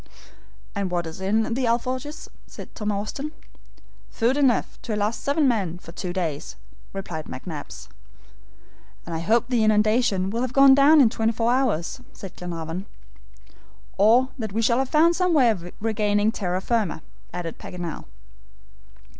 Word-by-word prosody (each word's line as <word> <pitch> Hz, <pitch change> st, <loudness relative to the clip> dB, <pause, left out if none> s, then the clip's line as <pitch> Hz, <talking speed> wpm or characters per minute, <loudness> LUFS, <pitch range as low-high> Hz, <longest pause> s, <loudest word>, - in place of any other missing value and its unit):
"And 200 Hz, -2 st, -2 dB
what 175 Hz, -1 st, -1 dB
is 160 Hz, +3 st, -8 dB
in 220 Hz, +4 st, +1 dB
the 255 Hz, 0 st, 0 dB
ALFORJAS?" 255 Hz, +6 st, -2 dB, 0.3 s
asked -, -, -9 dB
Tom 210 Hz, -2 st, -2 dB
Austin. 215 Hz, +9 st, -4 dB, 0.8 s
"Food 240 Hz, +3 st, +1 dB
enough 270 Hz, -5 st, +1 dB
to 220 Hz, -, -3 dB
last 210 Hz, +2 st, -1 dB
seven 285 Hz, +1 st, +2 dB
men 195 Hz, -9 st, 0 dB
for 165 Hz, -, -12 dB
two 180 Hz, +1 st, -5 dB
days," 165 Hz, -6 st, -3 dB, 0.4 s
replied 175 Hz, -5 st, -6 dB
McNabbs. 130 Hz, -, -8 dB, 1.2 s
"And 170 Hz, -, -6 dB
I 160 Hz, -, -2 dB
hope 230 Hz, +8 st, +2 dB
the 240 Hz, -4 st, +2 dB
inundation 215 Hz, -2 st, +2 dB
will 230 Hz, +2 st, -2 dB
have 255 Hz, -1 st, -2 dB
gone 275 Hz, 0 st, +8 dB
down 285 Hz, +3 st, +7 dB
in 230 Hz, -5 st, +5 dB
twenty 225 Hz, 0 st, 0 dB
four 230 Hz, +1 st, +1 dB
hours," 250 Hz, -5 st, 0 dB
said 195 Hz, -2 st, -10 dB
Glenarvan. 170 Hz, +1 st, -5 dB, 1.1 s
"Or 235 Hz, +6 st, +4 dB
that 220 Hz, -4 st, -4 dB
we 225 Hz, +2 st, 0 dB
shall 235 Hz, +2 st, +3 dB
have 265 Hz, -1 st, -1 dB
found 330 Hz, +2 st, +4 dB
some 360 Hz, -2 st, +2 dB
way 250 Hz, -6 st, +5 dB
of 175 Hz, -4 st, -6 dB
regaining 210 Hz, -1 st, +1 dB
terra 185 Hz, -4 st, -2 dB
firma," 205 Hz, -8 st, -1 dB, 0.3 s
added 170 Hz, -2 st, -5 dB
Paganel. 175 Hz, -3 st, -6 dB
215 Hz, 155 wpm, -24 LUFS, 180-250 Hz, 1.2 s, gone